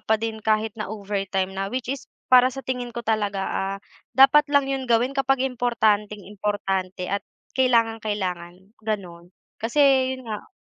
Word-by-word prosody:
pa 220 - +2
din 220 0 -4
kahit 215 0 +1
na 210 - -3
overtime 195 -2 -2
na. 195 0 -3
Which 255 +2 -3
is 270 -2 -8 0.2
para 250 0 +8
sa 270 +1 -8
tingin 250 -1 -3
ko 235 - -5
talaga, 205 -3 0
ah, 195 +1 -2 0.4
dapat 285 +2 +7
lang 285 -1 +3
'yun 270 -1 -3
gawin 240 +3 +3
kapag 270 -1 +1
importanteng-importante 210 -5 -1
at 200 +2 -1 0.3
kailangang-kailangan, 210 -7 0
gano'n. 185 -6 -5 0.3
Kasi 235 +6 0 0.4
'yun 255 - -12
nga 215 -2 -6
220 Hz, 145 wpm, -24 LUFS, 195-250 Hz, 0.4 s, para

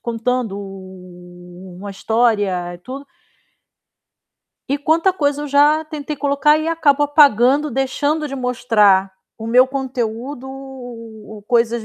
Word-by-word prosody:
contando 235 -2 -2
u 180 -2 -12
u 175 - -13
uma 200 +2 -8
história, 220 0 +1 0.3
eh, - - -12
tudo. 265 +9 -9 1.6
E 280 +1 0
quanta 325 +5 +2
coisa 290 -4 -1
eu 295 - -5
já 295 +3 +3
tentei 300 -1 -6
colocar 285 +2 +2
e 315 +1 -2
acabo 295 -3 +2
apagando, 285 0 +4
deixando 285 +3 -1
de 275 - -6
mostrar 220 -7 +2 0.3
o 225 - -7
meu 250 +3 +5
conteúdo, 260 0 -4 1.0
coisas 235 -2 +1
255 Hz, 120 wpm, -19 LUFS, 210-290 Hz, 1.6 s, meu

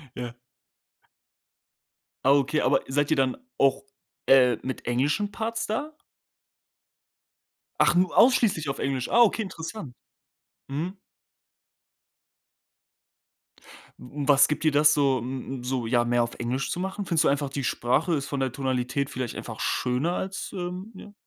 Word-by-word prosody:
Ja. 120 -1 -6 1.9
Ah - - +7
okay, 145 +2 +2
aber - - +3
seid 145 +3 0
ihr 155 - +3
dann 130 -1 +1 0.2
auch, 135 0 +3 0.4
äh, 125 -3 +5
mit 130 -2 -5
englischen 145 - 0
Parts 225 +2 -3
da? 290 +8 -3 1.8
Ach, - - +5
nur 180 0 +1
ausschließlich 210 - +4
auf 135 - -4
Englisch. 135 -3 -2
Ah, 240 - +4
okay, 230 -1 +4
interessant. 165 - -7 0.7
Mhm. 170 +8 -4 3.0
W 140 +3 -6
was 140 -2 +6
gibt 150 - -2
dir 155 - +3
das 150 +1 +5
so 135 -3 +2
m 130 +2 -5
m - - -10
so 125 -2 -2
ja, 120 0 +2
mehr 120 0 +1
auf 120 - -5
Englisch 125 +3 -2
zu 180 - -3
machen? 190 +2 -4
Findest 165 -3 +1
du - - +3
einfach, 140 0 0
die 140 +1 -4
Sprache 130 +8 0
ist 140 -2 -2
von 140 - -3
der 130 -1 0
Tonalität 130 +1 -2
vielleicht 125 -2 -4
einfach - - -7
schöner 130 +7 0
als 190 +1 -4
ähm, 180 +3 -5
ja? 205 +2 -12
140 Hz, 145 wpm, -26 LUFS, 130-180 Hz, 3.0 s, Ah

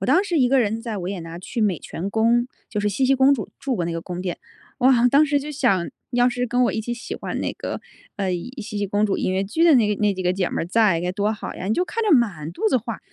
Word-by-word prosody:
我 195 - -2
当 330 +11 +4
时 355 -5 0
一 255 -3 +4
个 270 +1 +4
人 225 -2 0
在 230 -2 -4
维 185 0 -4
也 195 - -4
纳 165 +1 -8
去 225 +6 -5
美 195 -6 +1
泉 180 +4 -5
宫， 230 +3 +2 0.2
就 210 - -1
是 210 - +1
茜 205 +7 0
茜 270 - +4
公 265 +2 +5
主 220 -8 -5
住 265 -3 -2
过 175 - -1
那 170 - -2
个 165 - -3
宫 175 +1 -6
殿。 180 -2 -3 0.4
哇， 245 -1 +5
当 285 +4 +5
时 290 0 +2
就 295 +2 -6
想： 235 - +1 0.2
“要 245 0 +4
是 245 0 -2
跟 245 +2 +1
我 - - +1
一 - - -2
起 240 +2 -3
喜 235 - -7
欢 - - -4
那 - - -2
个， - - -5 0.4
呃， 195 -3 -1 0.3
茜 210 -1 -5
茜 205 - -1
公 205 +2 +1
主 200 -2 0
音 - - 0
乐 190 +1 0
剧 230 +12 -1
的 330 -3 +7
那 220 -5 +4
个 - - -10
那 205 -1 +2
几 185 - -4
个 180 0 +2
姐 185 -1 -1
们 - - -3
儿 165 - -2
在 195 -3 +3
该 180 - -1
多 205 +3 0
好 210 - -6
呀。” - - -7
你 215 - +1
就 360 - +1
看 455 +4 -3
着 425 - +2
满 175 -10 -1
肚 220 - 0
子 260 - +3
话 230 -2 -4
220 Hz, 325 characters per minute, -23 LUFS, 190-250 Hz, 0.4 s, 的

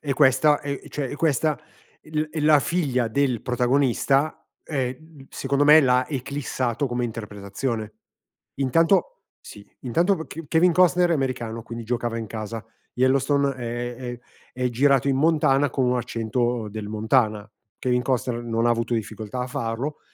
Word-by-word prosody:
e 140 -2 -2
questa 140 +2 +4
è 140 -1 -4
cioè 140 -3 -3
e 145 - -5
questa 155 -1 +1
è - - -26 0.5
l 155 0 -1
è 155 -1 -4
la 150 -1 +5
figlia 135 -8 0
del 130 -1 0
protagonista 135 +3 +1 0.2
ehm 135 +1 -5
secondo 140 +1 0
me 150 +2 +8
l'ha 125 -1 +3
eclissato 135 -2 -2
come 120 0 -2
interpretazione. 110 +1 -4 0.7
Intanto 165 +7 +2 0.2
sì, 100 -1 -13
intanto 170 - +1
K 165 0 -8
Kevin 170 +2 +4
Costner 180 0 +4
è 170 - +4
americano, 120 -5 -3
quindi 115 0 -7
giocava 120 0 -2
in 110 - -5
casa, 110 +1 -6 0.3
Yellowstone 135 +2 +2
è 120 0 -4
è 120 -1 -6 0.3
è 125 0 -1
girato 135 +2 +3
in 135 - +2
Montana 145 -2 +3
con 130 +1 0
un 125 0 +2
accento 120 -1 -1
del 105 0 -6
Montana, 110 -1 0 0.3
Kevin 125 -1 0
Costner 125 -2 -1
non 115 0 0
ha - - +4
avuto 115 +1 0
difficoltà 110 +2 -4
a 125 - -2
farlo, 130 +2 -3
130 Hz, 155 wpm, -24 LUFS, 115-145 Hz, 0.7 s, me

